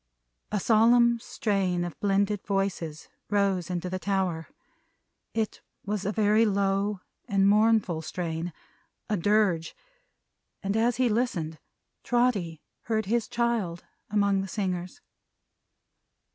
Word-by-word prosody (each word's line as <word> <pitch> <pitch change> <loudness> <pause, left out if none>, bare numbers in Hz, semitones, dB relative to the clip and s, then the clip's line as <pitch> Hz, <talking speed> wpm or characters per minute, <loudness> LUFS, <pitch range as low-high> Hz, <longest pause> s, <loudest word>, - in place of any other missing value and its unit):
A 210 - 0
solemn 235 +3 +4
strain 195 -6 -1
of 175 -2 -6
blended 200 0 +1
voices 195 -6 -2 0.2
rose 195 -4 +1
into 180 0 -2
the 185 +1 -3
tower. 185 -5 -1 0.9
It 220 -2 -2 0.2
was 205 -1 -2
a - - +1
very 215 +1 +3
low 200 -1 +1 0.3
and 195 -3 +3
mournful 210 -5 +3
strain 165 +1 -4 0.6
a - - +3
Dirge 195 -3 +1 0.9
and 200 +1 -1
as 230 +2 +2
he 255 -1 +2
listened, 205 - -1 0.4
Trotty 215 -10 0 0.2
heard 220 -1 0
his 230 +3 0
child 230 -8 -1 0.3
among 200 -1 +2
the 195 - -4
singers. 185 -3 -3
200 Hz, 115 wpm, -27 LUFS, 180-220 Hz, 0.9 s, solemn